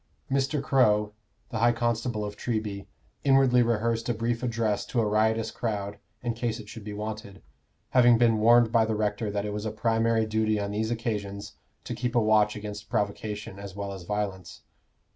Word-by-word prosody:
Mr. 135 +1 +1
Crow, 105 -6 +3 0.4
the 115 - -3
high 120 +1 +5
constable 115 -2 -1
of 105 0 -6
Treby, 105 -4 -3 0.4
inwardly 135 -2 +5
rehearsed 115 0 0
a 120 - +1
brief 115 +1 -1
address 115 -4 0
to 120 - -1
a 115 - +2
riotous 110 +1 +1
crowd 100 -3 -3 0.2
in 120 -1 -1
case 115 -1 -2
it 105 - -10
should 110 0 -9
be 105 - -6
wanted, 105 -1 -6 0.5
having 120 -2 +6
been 115 -2 +3
warned 115 +1 +5
by 115 -1 +4
the 110 0 -1
rector 105 0 -1
that 100 0 -2
it 105 - -3
was 105 0 -4
a - - 0
primary 115 +1 +1
duty 110 0 +1
on 100 0 -3
these 110 +2 -1
occasions 105 -3 -3 0.3
to - - -5
keep 125 0 -3
a - - +6
watch 110 -1 +3
against 105 0 -7
provocation 105 -2 -3
as 100 -2 -8
well 100 -1 -4
as 95 - -8
violence. 95 -1 -4
110 Hz, 185 wpm, -27 LUFS, 105-115 Hz, 0.5 s, having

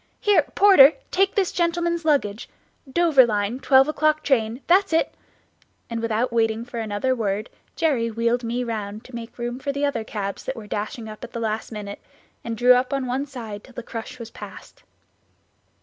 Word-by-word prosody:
Here, 415 -1 +4
porter! 345 -8 +8 0.2
take 390 +2 +2
this 390 -3 +1
gentleman's 340 -1 0
luggage 235 -9 0 0.4
Dover 325 -4 +5
line 210 +3 -1
twelve 270 0 +5
o'clock 310 0 +1
train 235 -2 +1
that's 375 0 +3
it," 325 - +2 0.8
and 230 0 -2
without 230 +2 -1
waiting 225 0 +1
for 240 -1 -6
another 220 +4 -1
word 210 -2 -2 0.2
Jerry 275 -8 +1
wheeled 230 +2 0
me 240 +2 -2
round 215 -2 -5
to 255 - -14
make 235 -1 -8
room 240 +1 -4
for 280 - -5
other 285 -5 0
cabs 200 -3 -5
that 265 - -3
were 225 -3 -9
dashing 215 +2 -4
up 215 0 -10
at - - -9
the 235 - -4
last 220 0 -3
minute, 205 -2 -7 0.4
and 230 -1 -4
drew 245 +2 +6
up 250 +2 +1
on 275 -1 -1
one 260 +3 -2
side 225 -7 -8
till 260 - -17
the 240 - -6
crush 230 +2 -7
was 230 -2 -9
past. - - -11
240 Hz, 180 wpm, -23 LUFS, 220-280 Hz, 0.8 s, porter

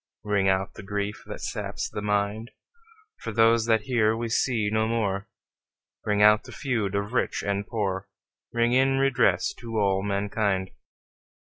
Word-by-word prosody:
Ring 100 -2 +2
out 95 0 0
the - - -10
grief 100 +1 -3
that - - -7
saps - - -4
the - - -6
mind, 105 +2 -1 0.7
For - - -5
those 115 +1 +4
that 110 -2 +3
here 110 -3 +2
we 115 0 -3
see 115 -2 +1
no 110 0 +1
more, 105 -2 -1 0.7
Ring 105 -1 +2
out 105 0 +6
the - - -10
feud 110 -8 -2
of 100 +3 -2
rich 125 - 0
and 100 0 -2
poor, 95 -4 -2 0.4
Ring 120 0 +1
in 135 +1 +3
redress 135 -2 +2
to 115 -1 -5
all 100 -2 +2
mankind. 100 -1 -1
105 Hz, 155 wpm, -26 LUFS, 100-115 Hz, 0.7 s, out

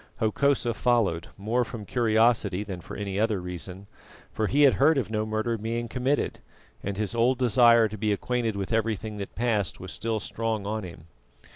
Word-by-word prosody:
Hokosa 120 +2 +1
followed, 110 -9 +1
more 110 +5 0
from 115 -2 -7
curiosity 110 -2 +2
than 95 -4 -7
for - - -9
any 100 -1 -3
other 110 -2 +1
reason, 90 +2 -7 0.5
for 110 -1 -1
he 145 +5 +3
had 140 - +7
heard 150 +3 +4
of 110 -6 -1
no 110 0 -1
murder 110 +1 -1
being 115 +2 -3
committed, 130 +5 -1 0.4
and 100 -1 -4
his 105 0 -2
old 120 +2 +2
desire 120 -2 +5
to 110 0 -7
be 105 0 +1
acquainted 115 +1 -1
with 100 +2 -3
everything 110 -1 -1
that 100 -1 -7
passed 110 -5 0
was 95 0 -7
still 115 -1 -2
strong 110 -1 -3
on 110 +1 -2
him. 85 -3 -10
110 Hz, 180 wpm, -27 LUFS, 100-120 Hz, 0.5 s, had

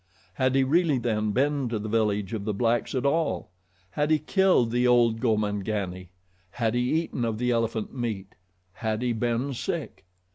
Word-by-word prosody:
Had 130 +6 +1
he 135 - +4
really 155 +1 +2
then 110 -3 0
been 140 +2 +1
to 115 - -1
the 105 +1 -5
village 105 -2 0
of 105 -3 -3
the 105 -1 -2
blacks 120 +4 0
at 130 - -1
all, 140 - 0 0.4
had 150 +7 0
he 155 - +4
killed 155 - +2
the 125 +1 +2
old 120 -2 +4
Gomangani, 105 -5 -1 0.4
had 115 +3 -1
he 125 +6 +1
eaten 125 - -4
of 115 -2 -1
the 125 +2 0
elephant 115 -2 -1
meat, 110 -6 -4 0.4
had 110 +3 -2
he 120 -1 +1
been 120 +4 -1
sick? 105 -6 -5
115 Hz, 175 wpm, -26 LUFS, 110-130 Hz, 0.4 s, he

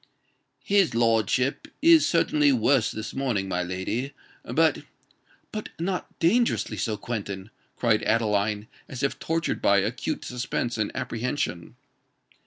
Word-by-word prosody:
"His 195 - +3
lordship 115 +3 +1
is 330 0 +6
certainly 150 -3 +3
worse 125 -1 +3
this 110 +1 -6
morning, 120 -8 -1
my 90 -1 -1
lady: 95 +9 -3 0.3
but——" - - +2 0.7
"But 215 0 -5
not 180 +2 -3
dangerously 230 +8 +2
so, 110 -3 -1
Quentin?" 100 -3 -5 0.2
cried 115 -3 +2
Adeline, 105 -1 +1 0.2
as 130 +1 -6
if 140 - -1
tortured 165 +1 -1
by 100 - +4
acute 115 +10 -2
suspense 120 -1 -3
and 105 - 0
apprehension. 115 - -3
120 Hz, 120 wpm, -26 LUFS, 105-145 Hz, 0.7 s, is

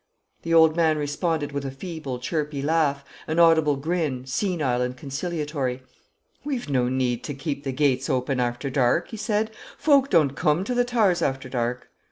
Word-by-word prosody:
The 165 - -5
old 160 -1 +6
man 160 -2 +3
responded 150 +1 -1
with 140 0 -3
a 135 - -3
feeble, 145 -2 -6
chirpy 150 +1 -3
laugh, 145 -2 +1 0.2
an 160 - -2
audible 160 -3 +5
grin, 145 -3 -2
senile 140 -4 0
and 125 0 -2
conciliatory. 140 -2 -3 0.6
"We've 270 - -3
no 125 -2 +2
need 125 -2 -1
to 145 - -4
keep 140 0 -4
t' 135 - -2
geates 135 -1 +1
open 130 +1 0
arter 120 +3 -2
dark," 130 +5 +2
he 220 - -7
said; 215 0 -1 0.3
"folk 280 -3 +4
doan't 150 -7 +3
coome 150 +6 +1
to 250 - -2
the 245 0 +2
Toowers 220 -8 +2
arter 135 -1 -1
dark." 125 0 -3
145 Hz, 175 wpm, -24 LUFS, 130-170 Hz, 0.6 s, old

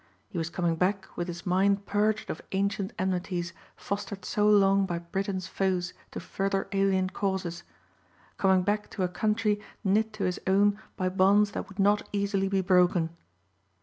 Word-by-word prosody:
He - - -7
was 165 0 -2
coming 170 -2 -1
back 190 +2 -1
with 175 - -3
his 175 0 -7
mind 195 +2 +2
purged 210 +1 0
of - - -7
ancient 195 0 0
enmities 180 -2 -2 0.2
fostered 200 -1 -5
so 210 0 +2
long 195 -1 +4
by 175 -2 -2
Britain's 185 +2 -3
foes 185 -2 -1 0.2
to - - -6
further 195 0 -2
alien 195 -1 +1
causes; 190 -4 -2 0.8
coming 190 -1 +3
back 210 +2 -1
to 190 - 0
a - - +2
country 210 +3 0 0.2
knit 215 +2 +2
to 215 -2 -4
his 180 0 -1
own 200 +2 +3 0.2
by 185 -2 0
bonds 200 +2 +4
that - - -5
would 195 - -13
not 205 +1 +3
easily 200 -1 0
be 195 0 +1
broken. 180 -3 +3
195 Hz, 165 wpm, -28 LUFS, 180-200 Hz, 0.8 s, long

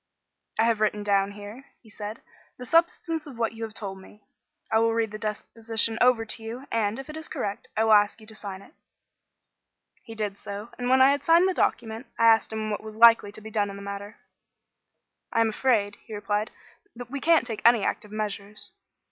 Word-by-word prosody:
"I 220 - +4
have 225 -2 +2
written 210 -1 +1
down 200 -1 +1
here," 205 +6 -10
he 220 - -19
said, 210 +1 -7 0.3
"the 250 - -8
substance 330 +1 +1
of 265 -5 -10
what 230 -1 0
you 225 - -11
have 220 -1 -11
told 195 -2 -5
me. 210 +2 -17 0.5
I 220 - +4
will 225 0 +2
read 225 -2 0
the 215 - -7
deposition 225 +1 -2
over 245 -2 +4
to 225 - -3
you, 235 +4 -7
and, 220 -1 0
if 270 - -8
it 305 - -8
is 315 0 -6
correct, 200 0 -4
I 220 - +3
will 220 -1 +5
ask 205 +1 +4
you 215 - -14
to 220 - -10
sign 200 -3 -8
it." - - -19 1.3
He 225 - -10
did 210 -2 -3
so, 205 +3 -7
and, 245 0 -1
when 260 0 +6
I 270 - +7
had 285 0 -1
signed 335 +4 +5
the 375 - +1
document, 230 -5 -1
I 230 - +3
asked 225 -1 +5
him 215 0 -3
what 205 - -3
was 215 0 -10
likely 230 -3 +7
to 215 - -8
be 220 +1 -9
done 205 -1 0
in 200 - -7
the 200 - -9
matter. 200 +1 -7 1.1
"I - - +1
am 225 - +3
afraid," 215 -3 +1
he 220 - -8
replied, 210 +1 -1 0.5
"that 245 0 -9
we 280 - -3
can't 330 -6 +4
take 225 -3 -5
any 235 -3 +6
active 210 - -2
measures. 210 -1 -5
220 Hz, 215 wpm, -26 LUFS, 210-235 Hz, 1.3 s, I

